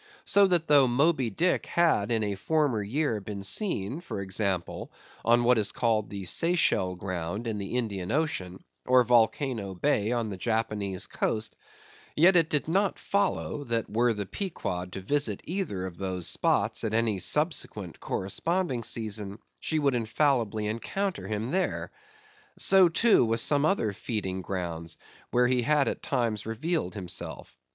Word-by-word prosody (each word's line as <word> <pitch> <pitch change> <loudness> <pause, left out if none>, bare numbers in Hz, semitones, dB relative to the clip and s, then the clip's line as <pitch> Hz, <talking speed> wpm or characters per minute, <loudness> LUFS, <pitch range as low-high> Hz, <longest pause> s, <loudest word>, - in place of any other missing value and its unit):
So 200 0 +5
that 175 -3 +1
though 145 -3 +6
Moby 135 0 +2
Dick 175 - 0
had 160 -11 +2
in 110 -2 +1
a 100 -1 -1
former 140 +1 0
year 115 +1 -1
been 100 0 -6
seen, 135 - 0
for 170 - -6
example, 95 -1 -2 0.3
on 120 +1 +4
what 120 -1 +4
is 105 -2 +3
called 110 -3 0
the 100 -1 -6
Seychelle 95 - +1
ground 95 +3 -4
in 110 -2 -3
the 100 +5 -3
Indian 100 -7 -3
ocean, 95 - -2 0.2
or 125 0 +6
Volcano 115 -3 +1
Bay 110 -1 +1
on 115 -3 -1
the 95 - -5
Japanese 105 -3 -2
Coast; 110 0 -2 0.6
yet 175 +5 +6
it 165 -2 +4
did 150 0 0
not 195 +4 +1
follow, 200 -6 -1
that 115 -2 -2
were 120 +3 +2
the 105 -2 -3
Pequod 90 - -4
to 95 - -5
visit 110 -1 0
either 160 - -3
of 90 -2 -8
those 95 -3 -3
spots - - +1
at 110 0 -1
any 115 -4 +1
subsequent 105 - -1
corresponding 165 - -1
season, 110 -3 -1 0.2
she 160 - -1
would 140 -3 +2
infallibly 115 -2 0
encounter 175 - -3
him 110 +3 -3
there. 190 +2 -1 0.7
So, 190 -2 +6
too, 220 - +4
with 115 0 +1
some 145 +4 +2
other 135 - +1
feeding 95 -3 -4
grounds, 85 -4 -4 0.3
where 125 0 +3
he 125 0 +2
had 145 +1 +2
at - - -2
times 115 -5 -1
revealed 120 - -2
himself. 90 -4 -4
115 Hz, 155 wpm, -28 LUFS, 100-150 Hz, 0.7 s, though